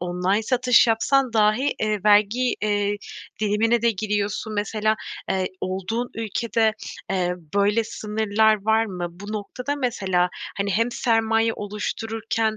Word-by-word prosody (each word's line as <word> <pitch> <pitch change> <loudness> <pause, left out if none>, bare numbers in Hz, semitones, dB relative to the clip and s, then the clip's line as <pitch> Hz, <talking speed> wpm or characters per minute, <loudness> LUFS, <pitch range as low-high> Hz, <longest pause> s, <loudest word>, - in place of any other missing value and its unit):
online 180 +4 0
satış 250 +1 +4
yapsan 250 +3 +2
dahi, 220 +5 +2
eee, 215 -1 0
vergi, 210 +4 +4
eee, 205 -1 +1 0.4
dilimine 220 +2 +2
de 235 - +4
giriyorsun. 210 +1 -2
Mesela, 215 +1 0 0.3
eee, 190 -1 +1
olduğun 195 +6 -3
ülkede, 225 0 0 0.4
eee, 180 -2 0 0.2
böyle 205 +3 +2
sınırlar 215 -1 +1
var 220 +1 +3
mı? 180 -4 -4
Bu 200 +5 -9
noktada, 250 +7 -4
mesela, 195 -9 0 0.3
hani, 200 0 -1
hem 230 +5 +1
sermaye 225 -1 +1
oluştururken 220 +1 -2
215 Hz, 125 wpm, -23 LUFS, 205-225 Hz, 0.4 s, satış